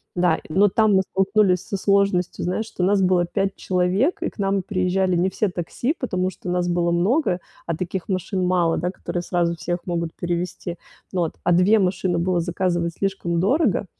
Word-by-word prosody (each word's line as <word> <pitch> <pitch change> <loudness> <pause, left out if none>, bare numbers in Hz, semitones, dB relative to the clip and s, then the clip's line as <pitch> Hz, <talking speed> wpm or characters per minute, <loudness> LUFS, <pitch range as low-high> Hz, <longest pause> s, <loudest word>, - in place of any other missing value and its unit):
Да, 175 -2 +2
но 195 +6 +4
там 215 +1 +3
мы 190 - +5
столкнулись 195 -1 +2
со - - -3
сложностью, 195 -2 +1
знаешь, 185 +5 -1
что 190 - -4
нас 195 +2 +3
было 180 -1 +3
5 195 +2 -1
человек, 185 - 0
и - - 0
к - - -24
нам 195 0 +1
приезжали 185 -1 0
не 175 +2 +2
все 200 +2 0
такси, 180 - -2
потому 185 -7 -1
что 185 - -8
нас 180 0 0
было 175 0 +1
много, 180 - +1 0.3
а 165 - -2
таких 180 +2 -4
машин 185 0 -1
мало, 175 -2 +2
да, 180 - -1
которые 175 -1 -4
сразу 175 -1 0
всех 175 +1 -3
могут 170 -2 -2
перевезти, 175 0 -3 0.4
вот. 175 -3 0
А - - +2
2 180 +5 +5
машины 185 -2 0
было 175 +1 +1
заказывать 175 0 -1
слишком 190 -4 -1
дорого, 235 - +2
180 Hz, 185 wpm, -22 LUFS, 175-195 Hz, 0.4 s, мы